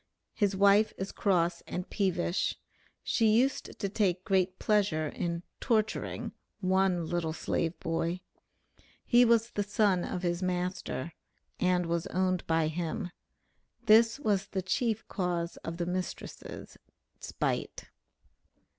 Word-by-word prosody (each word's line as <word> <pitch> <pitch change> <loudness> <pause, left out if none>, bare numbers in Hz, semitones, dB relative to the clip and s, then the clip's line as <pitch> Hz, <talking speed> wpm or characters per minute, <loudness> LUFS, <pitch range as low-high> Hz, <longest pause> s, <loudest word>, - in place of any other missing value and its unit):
'His 200 -3 +1
wife 200 +2 +5
is 190 +1 -4
cross 175 -4 +1
and 180 - -4
peevish.' 185 -2 0 0.5
She 225 - +2
used 240 +6 +2
to 200 - 0
take 190 -3 0
great 185 -1 +1
pleasure 195 -7 +1
in 170 +2 -3 0.2
'torturing' 220 -3 0 0.3
one 190 -2 +2
'little 165 -1 -1
slave 165 +1 -2
boy.' 165 +2 -1 0.8
He 240 0 +6
was 235 -1 +3
the 205 - -1
son 205 -3 +2
of 180 - -4
his 175 0 0
master 180 -3 -2 0.5
(and 180 -1 +2
was 170 0 -1
owned 185 0 0
by 160 -1 +2
him); 170 +4 -3 0.7
this 225 +3 +6
was 205 -6 +1
the 190 -2 -3
chief 220 +2 0
cause 175 -3 -2
of 165 0 -6
the 175 - -1
mistress' 180 +1 -6 0.4
spite." - - -3
185 Hz, 125 wpm, -30 LUFS, 175-205 Hz, 0.8 s, He